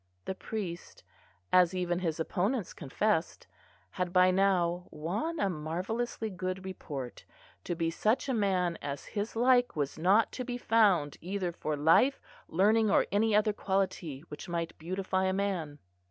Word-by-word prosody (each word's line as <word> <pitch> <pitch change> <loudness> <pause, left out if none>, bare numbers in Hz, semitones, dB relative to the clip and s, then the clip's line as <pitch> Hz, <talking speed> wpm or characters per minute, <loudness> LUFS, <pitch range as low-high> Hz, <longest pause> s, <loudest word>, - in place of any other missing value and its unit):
The - - -2
priest, 185 -3 -6 0.5
as 180 0 +5
even 175 -1 0
his 165 -3 -2
opponents 195 +6 -1
confessed, 165 +5 -1 0.5
had 180 -1 -2
by 185 0 +5
now 180 -2 +1
"won 205 - -3
a 200 - +2
marvellously 190 +8 -3
good 185 0 -4
report, 140 -9 -6 0.4
to 175 - -2
be 165 0 -1
such 215 +10 +1
a 265 - 0
man 185 -6 +1
as 140 -1 -5
his 210 +1 -4
like 245 +1 +3
was 145 0 -2
not 195 +6 +4
to 255 - -4
be 245 0 -4
found, 200 - +3
either 185 0 -2
for 155 -2 -3
life, 165 - +4 0.3
learning, 215 +5 +3
or - - +4
any 210 +1 +2
other 210 0 +3
quality 185 -8 -2
which 150 - -8
might 170 -1 -3
beautify 185 +3 -1
a 190 - +1
man." 185 -7 -2
185 Hz, 155 wpm, -30 LUFS, 170-210 Hz, 0.5 s, as